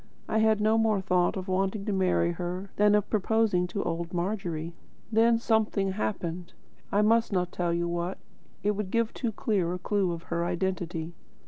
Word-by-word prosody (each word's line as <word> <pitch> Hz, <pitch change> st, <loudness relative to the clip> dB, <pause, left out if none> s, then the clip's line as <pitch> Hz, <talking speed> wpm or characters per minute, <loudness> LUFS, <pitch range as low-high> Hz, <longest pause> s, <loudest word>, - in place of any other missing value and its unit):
I 220 Hz, -, +1 dB
had 220 Hz, -1 st, +3 dB
no 215 Hz, +1 st, +3 dB
more 220 Hz, -2 st, +2 dB
thought 180 Hz, 0 st, +1 dB
of 190 Hz, +1 st, -5 dB
wanting 195 Hz, +2 st, 0 dB
to 210 Hz, -, -1 dB
marry 180 Hz, -2 st, +2 dB
her 180 Hz, +3 st, -5 dB
than 210 Hz, 0 st, +4 dB
of 210 Hz, -1 st, +1 dB
proposing 215 Hz, -3 st, +2 dB
to 190 Hz, +3 st, -3 dB
old 170 Hz, +1 st, -3 dB
Margery. 175 Hz, -3 st, -2 dB, 0.4 s
Then 230 Hz, +1 st, +4 dB
something 220 Hz, -4 st, +1 dB
happened, 180 Hz, -3 st, -3 dB, 0.4 s
I 205 Hz, +1 st, +3 dB
must 225 Hz, +1 st, +3 dB
not 180 Hz, -2 st, 0 dB
tell 175 Hz, -1 st, -1 dB
you 170 Hz, 0 st, 0 dB
what; 175 Hz, +2 st, -2 dB, 0.5 s
it 205 Hz, -, +3 dB
would 210 Hz, -2 st, -3 dB
give 230 Hz, +1 st, 0 dB
too 235 Hz, -3 st, -2 dB
clear 195 Hz, -5 st, 0 dB
a -, -, -3 dB
clue 180 Hz, -2 st, 0 dB
to 165 Hz, -, -15 dB
her 170 Hz, 0 st, -1 dB
identity. 175 Hz, -2 st, -2 dB
190 Hz, 185 wpm, -28 LUFS, 175-215 Hz, 0.5 s, than